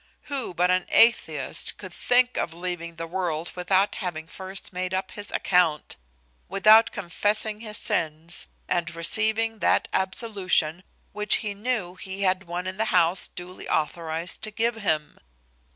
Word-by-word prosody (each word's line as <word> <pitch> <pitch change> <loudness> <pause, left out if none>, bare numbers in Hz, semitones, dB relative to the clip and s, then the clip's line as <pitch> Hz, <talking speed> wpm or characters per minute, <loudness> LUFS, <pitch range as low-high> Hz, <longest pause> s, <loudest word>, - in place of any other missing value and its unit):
Who 255 -10 -3
but 180 +2 +3
an 185 0 +1
atheist 230 +1 +3
could - - -9
think 250 0 +3
of 165 - -2
leaving 170 -1 -5
the 165 0 -5
world 170 -2 -2
without 190 +2 +2
having 170 -5 -4
first 190 +3 -6
made 185 +1 -2
up 190 0 -2
his 205 0 -5
account? 175 -5 +1 0.5
without 215 +4 +6
confessing 210 +3 -1
his 215 -2 -7
sins, 160 +1 -2 0.2
and 175 -1 -1
receiving 220 +6 0
that - - +2
absolution 190 -4 +1 0.3
which 210 -1 +2
he 205 - -1
knew 205 -4 -2
he 190 +1 -5
had 190 0 +2
one 175 +1 -4
in 185 0 -5
the 220 - +1
house 180 -3 +3
duly 180 +1 -9
authorized 160 +2 -2
to 215 - -4
give 230 +3 0
him? 160 -9 -2
185 Hz, 150 wpm, -25 LUFS, 170-210 Hz, 0.5 s, without